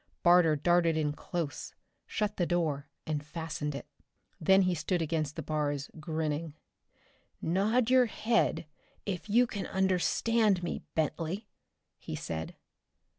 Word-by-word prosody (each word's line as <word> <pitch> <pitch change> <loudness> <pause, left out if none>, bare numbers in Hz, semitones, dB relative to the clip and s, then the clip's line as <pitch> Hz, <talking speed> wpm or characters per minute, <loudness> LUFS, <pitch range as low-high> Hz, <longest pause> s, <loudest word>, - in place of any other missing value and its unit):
Barter 175 -3 +6
darted 170 +1 +3
in 150 -2 0
close, 165 -2 -4 0.3
shut 210 -1 -1
the 175 - +1
door 155 -5 0 0.2
and 150 -2 -2
fastened 150 -2 -4
it. 140 - -6 0.5
Then 190 +4 +5
he 185 -1 +2
stood 175 +2 -1
against 155 -2 -1
the 160 - -4
bars, 145 -2 -2
grinning. 155 -1 -2 0.8
"Nod 220 +8 +2
your 255 -1 +6
head 225 -5 +1 0.4
if 200 +1 -4
you 240 +4 +5
can 205 -4 -5
understand 190 +2 +2
me, 175 - -3
Bentley," 165 +6 -1 0.5
he - - -6
said. 80 0 -5
170 Hz, 125 wpm, -31 LUFS, 155-190 Hz, 0.8 s, Barter